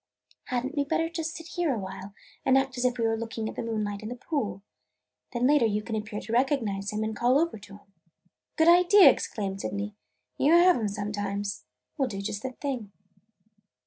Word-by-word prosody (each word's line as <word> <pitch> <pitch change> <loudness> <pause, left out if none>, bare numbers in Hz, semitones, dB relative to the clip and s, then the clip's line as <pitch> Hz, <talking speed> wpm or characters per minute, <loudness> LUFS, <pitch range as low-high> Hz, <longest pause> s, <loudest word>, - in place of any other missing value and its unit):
"Had 250 -1 -2
n't 270 - -5
we 285 - +2
better 325 +3 0
just 325 -1 -3
sit 330 - -8
here 350 -4 0
a - - -3
while 190 0 -7 0.3
and 265 - +4
act 270 -1 0
as 250 0 -1
if 250 0 +1
we 230 - -1
were 225 0 +2
looking 225 -1 -4
at - - -5
the - - -3
moonlight 210 -3 -3
on 215 - -6
the 245 - -5
pool? 225 - -3 0.7
Then 240 0 0
later 280 -4 +5
you 210 0 -1
can 220 0 -4
appear 210 0 -4
to 220 - -6
recognize 230 -6 +1
him 210 +1 -2
and 220 0 -3
call 245 +4 +3
over 325 -7 0
to 195 - -13
him." 195 -1 -27 0.6
"Good 320 - +3
idea!" 355 -2 +8
exclaimed 195 -5 -4
Sydney. 205 +1 -4 0.5
"You 300 - +4
have 350 +1 +7
'em 220 -3 -1
sometimes! 205 0 -3 0.3
We 270 - +3
'll - - -4
do 195 -3 -5
just 205 0 -3
that 255 0 -6
thing." 250 -8 -4
230 Hz, 210 wpm, -27 LUFS, 205-275 Hz, 0.7 s, idea